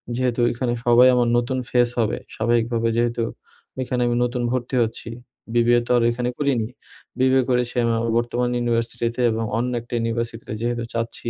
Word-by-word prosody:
যেহেতু 125 -1 0
ওইখানে 120 +1 -1
সবাই 120 +1 +6
আমার 120 -1 +2
নতুন 125 +2 -1
ফেস 120 -1 +3
হবে। 110 - +1 0.2
স্বাভাবিকভাবে 115 0 +1
যেহেতু 120 0 +1 0.6
ওইখানে 125 -1 -1
আমি 120 - +1
নতুন 125 0 -1
ভর্তি 125 0 -2
হচ্ছি, 115 +1 -5 0.4
BBA 120 0 +4
তো - - -1
আর - - +2
ওইখানে 120 +1 -1
করিনি। 135 -7 0 0.5
BBA 130 +1 +4
করেছি 125 -1 +1
আমি 115 - +2
আমার 115 0 -1
বর্তমান 120 +1 0
ইউনিভার্সিটিতে। 120 0 -1
এবং 115 +1 -2
অন্য 125 +2 -1
একটা 120 - -12
ইউনিভার্সিটিতে 115 -1 -3
যেহেতু 120 0 -1
চাচ্ছি 115 0 -3
120 Hz, 165 wpm, -22 LUFS, 115-125 Hz, 0.6 s, সবাই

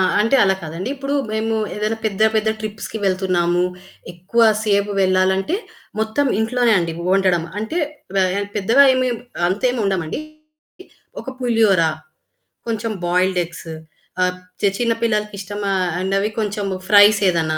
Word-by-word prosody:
ఆ! - - +4 0.2
అంటే 230 +6 +3
అలా 190 -1 +3
కాదండి! 165 +6 -5
ఇప్పుడు 275 +1 -3 0.2
మేము 220 +1 -1 0.2
ఏదైనా 215 +2 -1
పెద్ద 210 -2 -2 0.2
పెద్ద 215 0 +1
ట్రిప్స్‌కి 215 +1 -6
వెళ్తున్నాము. 180 -2 +1 0.5
ఎక్కువ 185 +7 -2 0.2
సేపు 205 -1 +1
వెళ్ళాలంటే 190 - +2 0.4
మొత్తం 220 +6 0
ఇంట్లోనే 235 +1 +2
అండి 170 -1 -2 0.2
వండడం. 185 -3 +2 0.2
అంటే 220 +11 -4 0.4
వ 190 -1 +3
యన్ 200 0 -2
పెద్దగా 225 +7 +4
ఏమి 255 0 +1 0.4
అంతేమి 245 +6 0
వండమండి. 190 - -2 1.0
ఒక - - -12
పులిహోరా, 215 -9 +3 0.8
కొంచెం 225 0 -2 0.2
బాయిల్డ్ 180 +1 +1
ఎగ్స్ 165 0 -11 0.5
ఆహ్, 180 0 +1 0.3
చె 200 - +4
చిన్న 235 -1 +1
పిల్లలకి 210 -2 0
ఇష్టమ 205 +1 -6 0.4
అనవి 195 +2 0
కొంచెము 205 -2 -2
ఫ్రైసేదన్నా 195 -6 +4
205 Hz, 130 wpm, -20 LUFS, 185-220 Hz, 1.0 s, ఆ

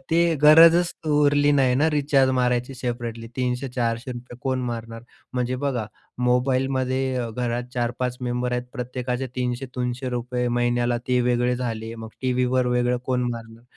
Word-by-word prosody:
ते 165 - +3 0.2
गरजच 165 +3 +7
उरली 145 -1 +3
नाही 130 -3 +3
ना, 150 +4 +3
रिचार्ज 140 -3 +3
मारायची 125 +1 0
सेपरेटली. 115 -2 -4
₹300-400 125 -1 -3
कोण 130 -1 0
मारणार? 115 -1 -6 0.3
म्हणजे 125 0 -1
बघा 125 -6 -1 0.4
मोबाईलमध्ये 130 +1 +1
अ, 120 -2 -2
घरात 120 +1 -2
4-5 125 +1 -2
मेंबर 125 0 -2
आहेत. 125 0 0
प्रत्येकाचे 125 0 -3
₹300-300 125 0 -2
महिन्याला 120 0 +1
ते 125 0 +3
वेगळे 125 0 +1
झाले. 115 -2 -4
मग 110 -1 -8
टीव्हीवर 125 0 +1
वेगळं 125 0 +1
कोण 125 -1 +1
मारणार? 115 0 -8
125 Hz, 130 wpm, -24 LUFS, 120-130 Hz, 0.4 s, गरजच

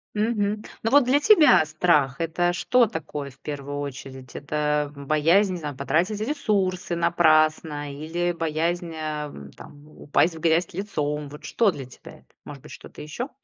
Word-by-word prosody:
Мгм. 210 -1 0 0.2
Ну, 225 - 0
вот 285 -2 +6
для 265 +3 +3
тебя 310 - +6
страх- 150 -4 +1
это 170 +2 0
что 245 +7 +3
такое 150 -8 -6
в 130 - -24
первую 145 -1 -6
очередь? 130 -2 -8
Это 150 0 -1
боязнь, 155 +8 +2
не - - -3
знаю, 150 -3 -6
потратить 170 +10 0
ресурсы 200 - -1
напрасно 155 -3 +2
или 165 +5 -2
боязнь, 165 +1 -2
э, 155 -2 -4 0.2
там, 145 0 -14
упасть 155 +2 0
в - - -9
грязь 165 +2 +1
лицом? 150 -6 -3
Вот 150 +2 -12
что 220 +3 +2
для 140 -6 -8
тебя 125 - -14
это? 65 - -28 0.2
Может 145 -2 -10
быть, - - -14
что-то - - -11
ещё? 195 - -5
160 Hz, 160 wpm, -24 LUFS, 145-185 Hz, 0.2 s, вот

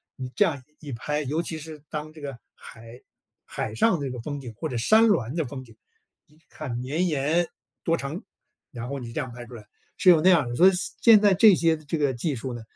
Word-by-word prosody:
你 130 -1 -6
这 205 - +4
样 145 -6 -2 0.2
一 145 -3 -9
拍。 150 +6 -3
尤 150 +5 -1
其 165 -2 -5
是 155 -1 -10
当 155 0 -6
这 155 - -13
个 140 -4 -6 0.2
海 115 +2 -13 0.4
海 110 - -5
上 175 - +2
这 135 -3 -3
个 125 - -6
风 145 +2 -5
景 125 -4 -9
或 - - -4
者 125 - -3
山 220 - +5
峦 130 - +1
的 165 - 0
风 130 0 -7
景， 115 -3 -18 0.5
一 150 0 -26
看 155 -5 -7
绵 150 +9 -1
延， 155 +3 +1 0.4
多 165 0 +1
长， 140 +6 -6 0.5
然 120 -2 -6
后 140 0 -4
你 120 -2 -8
这 115 - -4
样 130 -3 -6
拍 120 0 -9
出 125 - -11
来， 110 -3 -11 0.3
是 185 - +4
有 160 -3 +5
那 185 - +5
样 160 -9 +4
的。 120 - -4
所 180 +8 +6
以 190 - +7 0.3
现 225 -3 +8
在 205 -2 +4
这 200 +1 +7
些 165 -1 +2
这 155 +1 -4
个 145 -3 +1
技 135 +4 -2
术 125 +2 -5
呢， 120 - -7
145 Hz, 260 characters per minute, -25 LUFS, 125-165 Hz, 0.5 s, 现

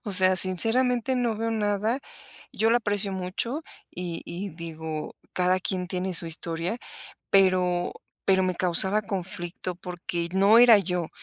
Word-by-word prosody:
O 210 - -4
sea, 185 0 +7
sinceramente, 235 +7 +3
no 240 -3 -1
veo 225 +1 -2
nada". 215 +3 -1 0.5
Yo 225 +1 +1
la 240 - +4
aprecio 205 -3 -1
mucho 190 - -3 0.3
y 175 -2 -6
y 195 +3 -6
digo, 160 -1 -7 0.2
cada 180 +1 +1
quien 185 -1 -3
tiene 185 0 -3
su 165 - +4
historia, 165 +6 -3 0.5
pero 185 -2 +2 0.3
pero 190 -1 +3
me 185 - -1
causaba 190 +4 +4
conflicto 185 -2 -6
porque 175 -1 -5
no 200 +4 +5
era 235 -3 +8
yo. 180 -3 -3
185 Hz, 145 wpm, -25 LUFS, 175-215 Hz, 0.5 s, era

